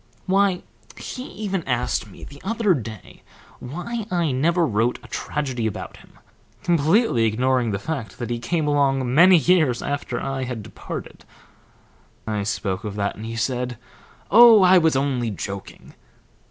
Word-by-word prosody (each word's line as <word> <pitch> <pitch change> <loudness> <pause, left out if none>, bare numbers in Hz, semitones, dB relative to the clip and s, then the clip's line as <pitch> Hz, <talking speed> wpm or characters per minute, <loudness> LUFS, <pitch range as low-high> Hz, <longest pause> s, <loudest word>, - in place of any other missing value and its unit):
"Why, 195 -1 +2 0.3
he 255 0 -7
even 195 -6 -4
asked 120 -3 -1
me - - -14
the 140 0 -12
other 215 -1 +1
day 110 - -7 0.4
why 200 - -5
I 170 -6 0
never 165 +7 +2
wrote 115 -1 0
a - - -12
tragedy 130 -6 -3
about 110 - -6
him, - - -20 0.5
completely 170 - +2
ignoring 125 +2 +1
the 100 - -1
fact 110 -4 -5
that 120 -1 -5
he 120 - -2
came 155 +6 -1
along 135 -3 +1
many 180 +5 +7
years 160 -7 +2
after 145 0 -3
I 135 -1 -3
had 120 -4 -5
departed. 110 - -8 1.0
I 105 -2 -2
spoke 100 -1 -3
of 105 -2 -5
that, 100 -1 -2
and 110 +1 -8
he 115 - -5
said, 125 +1 -2 0.5
'Oh, 225 -2 +8
I 185 0 +7
was 160 -3 +2
only 130 -4 0
joking.' 100 -1 -7
135 Hz, 155 wpm, -22 LUFS, 115-175 Hz, 1.0 s, Oh